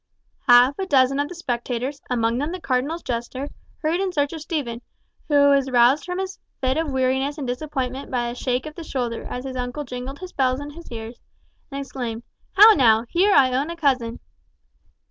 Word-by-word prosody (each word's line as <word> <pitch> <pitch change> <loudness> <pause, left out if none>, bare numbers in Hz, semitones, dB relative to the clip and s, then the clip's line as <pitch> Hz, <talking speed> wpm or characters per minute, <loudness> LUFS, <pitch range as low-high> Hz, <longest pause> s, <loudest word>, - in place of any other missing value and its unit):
Half 245 +5 +6
a 385 - -2
dozen 270 -2 +3
of 290 +1 0
the 360 - -8
spectators, 255 -1 -3
among 235 -1 +1
them 295 +4 -2
the 365 - -5
cardinal's 285 +4 -1
jester, 255 +3 -4 0.3
hurried 330 +4 +1
in 385 -1 0
search 285 -3 0
of 320 - -6
Stephen, 280 -8 -3 0.5
who 285 -1 +5
was 275 -1 +3
roused 250 +4 +4
from 360 0 -4
his 380 0 -4 0.2
fit 260 -1 +1
of 320 -2 -1
weariness 265 +2 0
and 285 - -4
disappointment 260 0 -3
by 245 -2 -1
a - - -4
shake 250 +1 -2
of 305 - -7
the 335 - -8
shoulder 245 -6 -3
as 250 +1 -5
his 260 -1 -5
uncle 250 +4 -3
jingled 250 +1 -6
his 370 +2 -9
bells 260 -1 +1
in 290 0 -7
his 335 0 -12
ears, 225 +1 -7 0.5
and 275 -1 -5
exclaimed, 245 -4 -5 0.3
"How 430 +3 +9
now, 230 - +4
here 390 +4 +3
I 260 -2 +5
own 280 +5 0
a 340 - -4
cousin!" 260 -7 0
270 Hz, 200 wpm, -23 LUFS, 250-305 Hz, 0.5 s, How